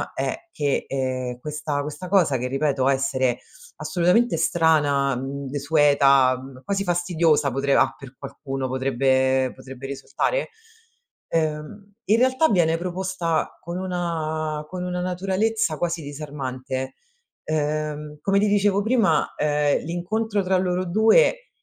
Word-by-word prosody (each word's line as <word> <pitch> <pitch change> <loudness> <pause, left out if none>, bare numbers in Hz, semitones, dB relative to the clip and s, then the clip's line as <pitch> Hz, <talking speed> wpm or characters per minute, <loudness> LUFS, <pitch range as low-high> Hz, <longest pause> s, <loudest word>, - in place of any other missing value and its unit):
è 345 - -3
che, 145 -2 -1
ehm, 130 -2 -2
questa 150 0 -3
questa 150 +5 -6
cosa 175 -8 +3
che, 125 +1 -3
ripeto 135 0 0
essere 130 -2 +1 0.4
assolutamente 185 +7 +2
strana, 145 -5 +2
mhmm, 135 +2 -5
desueta, 140 -2 +4
mhmm, 130 -1 -12
quasi 195 +6 -1
fastidiosa 170 -5 +2
potre 135 +2 0
a - - +3
per 135 -1 -12
qualcuno 135 -1 -5
potrebbe 130 0 +1
potrebbe 130 0 -10
risultare, 140 - -2 0.8
ehm, 160 +6 -3
in 215 - +3
realtà 260 +5 +3
viene 165 -5 +3
proposta 180 -2 -2
con 170 +1 -5
una 160 -4 -3
con 180 -1 -5
una 180 0 -3
naturalezza 190 0 0
quasi 170 0 -2
disarmante, 135 -3 -5 0.5
uhm, 150 -1 -2
come 195 +3 +2
ti 210 - +2
dicevo 205 -1 +2
prima, 220 -9 +2
ehm, 150 -1 +1
l'incontro 200 +6 -1
tra 185 0 +2
loro 180 0 0
2, 225 - +3
155 Hz, 125 wpm, -23 LUFS, 135-185 Hz, 0.8 s, desueta